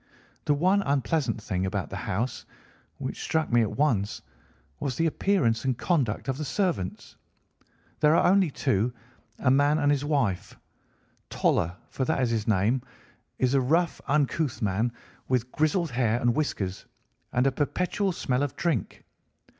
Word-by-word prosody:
The 145 Hz, -, +3 dB
one 185 Hz, +7 st, +3 dB
unpleasant 140 Hz, -, 0 dB
thing 95 Hz, -5 st, -2 dB
about 95 Hz, -1 st, -3 dB
the -, -, -4 dB
house, 115 Hz, +7 st, -3 dB, 0.5 s
which -, -, -5 dB
struck 160 Hz, -3 st, 0 dB
me 120 Hz, -, +6 dB
at 110 Hz, -, -2 dB
once, 115 Hz, -9 st, +1 dB, 0.6 s
was 130 Hz, -3 st, -2 dB
the 165 Hz, -, +1 dB
appearance 155 Hz, -, +1 dB
and 130 Hz, -3 st, 0 dB
conduct 140 Hz, -, 0 dB
of 135 Hz, +1 st, -2 dB
the -, -, -2 dB
servants. 165 Hz, -, -2 dB, 0.8 s
There 150 Hz, +1 st, +5 dB
are -, -, +4 dB
only 190 Hz, -1 st, +4 dB
two, 125 Hz, -4 st, 0 dB, 0.4 s
a 130 Hz, -, +2 dB
man 145 Hz, +3 st, +4 dB
and 145 Hz, -2 st, +3 dB
his 145 Hz, -1 st, +1 dB
wife. 135 Hz, -, -1 dB, 0.7 s
Toller, 85 Hz, +2 st, +1 dB, 0.2 s
for 130 Hz, -, -2 dB
that 160 Hz, -, 0 dB
is 125 Hz, -3 st, +1 dB
his 110 Hz, -2 st, -1 dB
name, 110 Hz, +5 st, +2 dB, 0.6 s
is 130 Hz, 0 st, +1 dB
a 135 Hz, -, +4 dB
rough, 165 Hz, +6 st, +1 dB
uncouth 145 Hz, -2 st, +1 dB
man, 110 Hz, +2 st, 0 dB, 0.4 s
with 125 Hz, -1 st, 0 dB
grizzled 155 Hz, +1 st, +1 dB
hair 120 Hz, -1 st, +1 dB
and 120 Hz, -1 st, +2 dB
whiskers, 100 Hz, -10 st, -2 dB, 0.4 s
and 125 Hz, +2 st, +2 dB
a 135 Hz, -, +4 dB
perpetual 180 Hz, +8 st, -1 dB
smell 130 Hz, -6 st, -1 dB
of 145 Hz, -2 st, -2 dB
drink. 155 Hz, -, -2 dB
135 Hz, 155 wpm, -27 LUFS, 115-155 Hz, 0.8 s, me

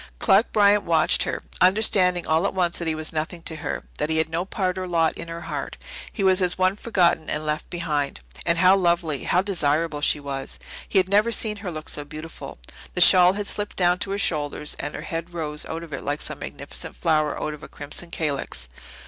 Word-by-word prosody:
Clark 200 Hz, -, +3 dB
Bryant 205 Hz, -1 st, +4 dB
watched 165 Hz, -2 st, +3 dB
her, -, -, -3 dB, 0.2 s
understanding 185 Hz, -2 st, +4 dB
all 160 Hz, +5 st, +2 dB
at -, -, -5 dB
once 175 Hz, -2 st, +1 dB
that 170 Hz, -, -3 dB
he 160 Hz, -, 0 dB
was 155 Hz, 0 st, -3 dB
nothing 160 Hz, +2 st, -4 dB
to 160 Hz, -, -1 dB
her, 145 Hz, -1 st, -4 dB, 0.2 s
that 150 Hz, -, 0 dB
he 160 Hz, -, +1 dB
had 160 Hz, 0 st, +1 dB
no 165 Hz, +3 st, -2 dB
part 185 Hz, -2 st, -2 dB
or 185 Hz, -, -4 dB
lot 165 Hz, -2 st, +2 dB
in 170 Hz, -, -8 dB
her 165 Hz, 0 st, -6 dB
heart. -, -, -5 dB, 0.3 s
He 200 Hz, -, -3 dB
was 190 Hz, 0 st, +4 dB
as 180 Hz, -1 st, 0 dB
one 185 Hz, +1 st, +2 dB
forgotten 180 Hz, -7 st, +1 dB
and 155 Hz, +1 st, -2 dB
left 150 Hz, 0 st, -2 dB
behind. 150 Hz, -, -2 dB, 0.2 s
And 170 Hz, 0 st, +1 dB
how 185 Hz, +2 st, +6 dB
lovely, 170 Hz, -5 st, +1 dB
how 180 Hz, +2 st, +2 dB
desirable 155 Hz, -5 st, 0 dB
she 150 Hz, -, +3 dB
was! 135 Hz, -1 st, -5 dB, 0.3 s
He -, -, +1 dB
had 185 Hz, -1 st, +4 dB
never 210 Hz, +4 st, +3 dB
seen 215 Hz, -1 st, -1 dB
her 200 Hz, -2 st, -5 dB
look 155 Hz, -1 st, -7 dB
so 145 Hz, -, -2 dB
beautiful. 155 Hz, +3 st, -9 dB, 0.4 s
The -, -, +1 dB
shawl 180 Hz, 0 st, +8 dB
had 205 Hz, +1 st, -3 dB
slipped 205 Hz, +1 st, -2 dB
down 180 Hz, -1 st, +3 dB
to 195 Hz, -, -3 dB
her 200 Hz, -, -1 dB
shoulders 150 Hz, -5 st, -1 dB
and 145 Hz, +1 st, -4 dB
her -, -, -6 dB
head 165 Hz, +1 st, -5 dB
rose 150 Hz, -2 st, -4 dB
out 165 Hz, +1 st, -5 dB
of 160 Hz, -3 st, -10 dB
it 140 Hz, -, -5 dB
like 145 Hz, +1 st, -2 dB
some -, -, -7 dB
magnificent -, -, -7 dB
flower 155 Hz, -2 st, +1 dB
out 155 Hz, -, -3 dB
of 150 Hz, -, -10 dB
a -, -, -9 dB
crimson 150 Hz, +4 st, -6 dB
calyx. 140 Hz, -, -3 dB
170 Hz, 225 wpm, -24 LUFS, 155-185 Hz, 0.4 s, shawl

